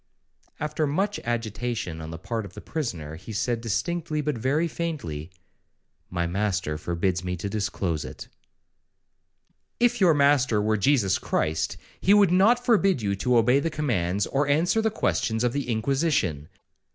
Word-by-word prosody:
'—After 150 0 -1
much 195 +8 0
agitation 115 -6 -3
on 80 - -7
the 80 - -6
part 115 +5 -3
of 95 -2 -11
the - - -7
prisoner, 85 - -4
he 95 +6 -10
said 115 +2 -1
distinctly, 160 - -2
but 150 -1 -1
very 140 +8 +1
faintly, 140 - -4 0.8
'My 85 -1 -1
master 95 -3 -1
forbids 90 +2 -1
me 90 0 -2
to 95 - -4
disclose 95 -6 -2
it.' - - -9 1.5
If 240 -2 +2
your 170 -5 +6
master 140 -6 +3
were 110 +1 +1
Jesus 105 -3 +2
Christ, 80 +2 -1 0.2
he 200 - +5
would 200 -4 +5
not 225 +7 +4
forbid 195 - +3
you 100 -1 0
to 125 +4 +2
obey 125 +4 +4
the 165 - -1
commands, 105 - 0
or 140 +1 0
answer 165 +9 +2
the 220 - +2
questions 110 - 0
of 120 -1 +1
the 140 -3 -3
Inquisition.' 110 - 0
120 Hz, 155 wpm, -26 LUFS, 95-155 Hz, 1.5 s, your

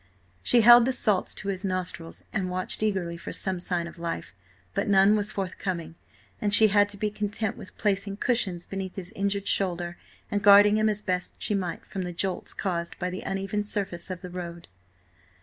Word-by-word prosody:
She 240 - +4
held 240 +1 +9
the 260 - +1
salts 210 -6 0
to 200 - -5
his 190 0 -3
nostrils 185 -3 -4
and 185 -3 -1
watched 185 +3 -3
eagerly 190 -5 -1
for - - -7
some 190 -2 -2
sign 175 -1 -1
of 170 +1 -10
life. 170 -10 -4 0.4
But - - -1
none 200 +1 +5
was 210 0 -1
forthcoming, 185 -3 -4 0.5
and 205 - +1
she 215 +1 +7
had 205 0 +4
to 205 - -6
be 210 +1 -1
content 210 0 -2
with - - -12
placing 200 -1 -1
cushions 195 -8 0
beneath 190 -1 -5
his 180 -2 -6
injured 200 0 -2
shoulder, 175 -2 -1 0.3
and 205 - 0
guarding 205 +1 +7
him 215 0 +3
as 210 0 0
best 180 -1 -2
she - - -1
might 185 -4 -3
from 195 - -5
the 180 -1 -4
jolts 185 +2 -2
caused 170 -3 -3
by 180 0 -2
the 185 - -5
uneven 195 +2 -2
surface 195 -4 -3
of 185 -1 -5
the 180 - -7
road. 170 -1 -7
195 Hz, 195 wpm, -27 LUFS, 180-205 Hz, 0.5 s, held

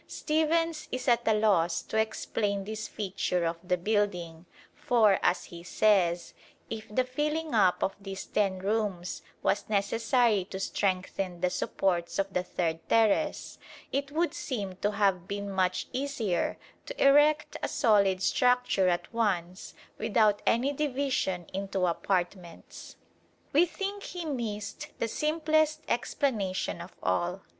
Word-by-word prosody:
Stephens 315 0 0
is 255 +1 -4
at 240 -1 +3
a 220 - +5
loss 180 -6 +2
to - - -7
explain 210 -2 -1
this 215 +1 -5
feature 185 -3 -2
of 165 0 -1
the 180 0 0
building, 180 -4 -1 0.3
for, 215 -5 +3
as 180 - +2
he 170 -1 -10
says, 175 -2 +2 0.4
if 220 -1 -5
the 255 +5 +1
filling 300 +4 -2
up 190 -5 +3
of 195 - 0
these 195 -1 -6
ten 195 -3 0
rooms 195 -2 -2 0.2
was 200 - 0
necessary 220 +1 +2
to 190 0 -7
strengthen 185 -2 -2
the 180 - +1
supports 175 -3 -1
of 195 -1 -1
the 180 - +1
third 170 -2 -2
terrace, 225 +7 +2 0.3
"it 280 +1 -2
would 330 +1 0
seem 215 - -4
to 205 - 0
have 195 -3 +1
been 200 0 -4
much 185 -1 0
easier 250 -9 -1 0.3
to - - -7
erect 295 +2 +4
a - - 0
solid 200 -6 +3
structure 250 -5 +3
at 175 +6 -2
once, 185 -5 -1 0.2
without 215 -4 +2
any 260 +5 +2
division 265 - -1
into 195 -1 -1
apartments." 175 0 -3 0.6
We 330 +5 +5
think 400 +3 -4
he 355 -3 -6
missed 225 -8 -4
the 230 - -1
simplest 310 +2 +1
explanation 210 -9 -1
of 175 - -11
all. 175 - 0
205 Hz, 135 wpm, -29 LUFS, 185-255 Hz, 0.6 s, a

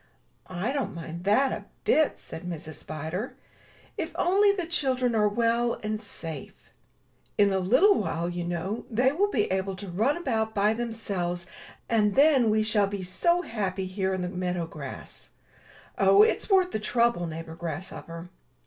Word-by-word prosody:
''I 185 +8 -2
don't 245 -11 -2
mind 170 +1 -7
that 255 +7 +4
a - - -5 0.2
bit,*' 310 -2 +3
said 160 - -9
Mrs. 165 -3 -6
Spider, 160 - -5 0.6
*'if - - -3
only 400 +3 +4
the 380 -4 -2
children 260 -7 +1
are 210 -2 +3
well 235 +2 +1
and 215 0 -2
safe. 160 -9 -9 0.7
In 205 -1 +4
a 190 - +2
little 255 - +5
while, 170 - -1
you 175 0 -3
know, 175 +6 -3
they 250 +4 +3
will 395 +8 +1
be 220 - +1
able 190 0 -1
to 195 +2 -8
run 225 - +1
about 220 -9 -1
by 210 +1 +3
them 235 +1 -3
selves, 180 -6 -3 0.4
and 210 -3 +2
then 275 -4 +5
we 215 0 +3
shall 215 -2 +2
be 200 -1 -4
so 340 - +1
happy 195 - -2
here 190 0 -2
in 185 -1 -2
the - - -1
meadow 180 -2 -2
grass. 165 - -8 0.7
Oh, 410 - +7
it's 445 - +1
worth 375 -2 +4
the - - -2
trouble, 235 -5 +1
neighbor 160 0 -7
Grasshopper." 170 +1 -6
210 Hz, 165 wpm, -27 LUFS, 180-250 Hz, 0.7 s, Oh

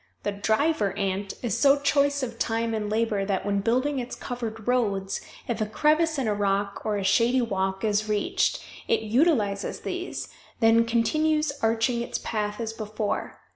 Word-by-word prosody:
The - - 0
"Driver 210 - +1
Ant" 195 0 -2
is 240 - 0
so 280 0 +5
choice 285 0 +2
of 235 -2 -5
time 225 0 0
and 210 -1 -2
labor 215 -2 0
that, 195 -1 -1
when 200 -1 +1
building 255 +7 +1
its 245 0 -5
covered 225 -3 -6
roads, 200 -6 0 0.3
if 235 -2 -2
a 215 - 0
crevice 310 +7 +2
in 265 -4 0
a 210 - +2
rock 200 0 -1
or 210 -1 0
a 200 - -2
shady 230 +6 +3
walk 190 -2 -2
is 215 0 +1
reached, 210 -1 0 0.2
it - - +2
utilizes 220 -4 +1
these, - - -4 0.3
then 230 0 +5
continues 305 +6 +2
arching 230 +2 +1
its 235 - -3
path 210 -1 -3
as 225 -1 -3
before. 215 -1 -4
225 Hz, 170 wpm, -26 LUFS, 205-250 Hz, 0.3 s, so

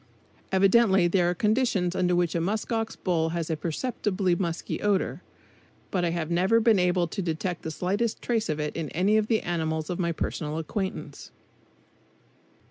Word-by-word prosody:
Evidently 195 -1 +4
there 175 0 +2
are 180 - -1
conditions 210 -4 +1
under 180 -1 +2
which 175 -2 +1
a 170 - 0
musk 210 +7 -2
ox 225 -1 -1
bull 165 -3 0
has 165 -1 -2
a - - +1
perceptibly 185 +2 -1
musky 170 -2 -3
odor, 205 -2 0 0.7
but 180 -2 0
I 175 - +2
have 170 -1 -3
never 185 +6 +3
been 225 -3 +4
able 180 -1 +2
to 195 - -4
detect 175 +1 -3
the - - -5
slightest 200 +8 -1
trace 230 -5 -1
of 155 0 -1
it 150 0 -3
in 160 -3 -3
any 190 +6 +2
of 215 -1 +1
the 220 -1 +2
animals 160 -2 -2
of 175 - -3
my 170 -2 +1
personal 155 -1 -3
acquaintance. 190 +4 -4
180 Hz, 175 wpm, -27 LUFS, 170-205 Hz, 0.7 s, Evidently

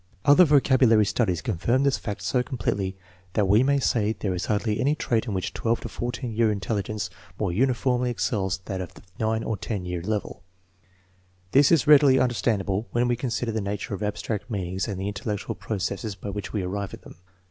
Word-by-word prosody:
Other 145 +6 +7
vocabulary 130 -7 +4
studies 95 - 0
confirm 120 +10 +1
this 140 -1 +2
fact 100 -3 -5
so 125 +7 +1
completely 100 -7 -2 0.4
that 105 -3 +2
we 105 +4 +5
may 140 +2 +3
say 110 -5 +1
there 100 -4 -3
is 90 - -3
hardly 105 0 0
any 145 +3 +2
trait 120 -5 -1
in 105 - -2
which 95 - -3
12 115 0 0
to - - -6
14 120 0 -4
year 110 0 +3
intelligence 100 -1 -3 0.3
more - - -1
uniformly 125 +3 +1
excels 100 -5 -1
that 95 -2 -3
of 90 - -8
the - - -15 0.2
9 110 0 0
or 110 - -2
10 95 -1 -4
year 90 -1 -3
level. 105 +3 -3 1.1
This 140 +1 +5
is 165 -6 +4
readily 145 -3 +7
understandable 105 -4 0
when 120 +1 +1
we 120 - +2
consider 120 -1 -2
the 110 0 -2
nature 100 +1 -4
of 100 - -5
abstract 105 +1 -3
meanings 95 -2 -2
and 100 -3 -4
the 95 - -2
intellectual 105 0 -3
processes 100 +1 -3
by 100 +1 -6
which 105 0 -5
we 105 -3 -2
arrive 100 +2 -4
at - - -20
them. - - -13
110 Hz, 195 wpm, -25 LUFS, 100-120 Hz, 1.1 s, Other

